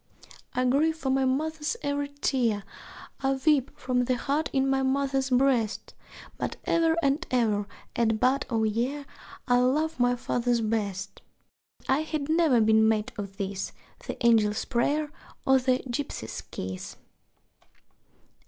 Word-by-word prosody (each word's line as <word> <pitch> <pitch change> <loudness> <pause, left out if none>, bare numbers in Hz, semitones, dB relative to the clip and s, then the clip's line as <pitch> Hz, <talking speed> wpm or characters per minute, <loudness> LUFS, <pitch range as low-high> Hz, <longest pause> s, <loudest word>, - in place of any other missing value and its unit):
I 255 - +1
grieve 305 +5 +2
for 270 -4 -1
my 265 0 +2
mother's 310 - -1
every 285 0 -1
tear, 255 -7 0 0.6
I 270 0 +1
weep 270 0 +2
for 255 -3 -5
the 255 +1 +1
hurt 290 +5 -1
in 270 -1 +1
my 270 0 +2
mother's 270 0 0
breast, 250 -4 +1 0.5
But - - -3
ever 330 -1 +2
and 280 +4 +2
ever 215 -5 +1 0.3
at 225 -2 +1
bud 260 +3 +2
o' 225 -3 +1
year 245 +7 -1 0.4
I 245 -1 +4
love 300 +5 +1
my 245 0 +3
father 245 0 0
best. 200 -3 -2 0.6
(That - - -26
I - - 0
had 310 -2 -3
never 315 -6 +4
been 220 0 +5
made 215 -1 0
of 200 -2 -7
this 195 -1 -4 0.3
The - - -4
angel's 215 -2 +3
prayer, 290 +5 0 0.3
or 265 0 +5
the 255 0 +1
gipsy's 240 - -4
kiss!) 95 0 -6
260 Hz, 145 wpm, -27 LUFS, 225-285 Hz, 0.6 s, been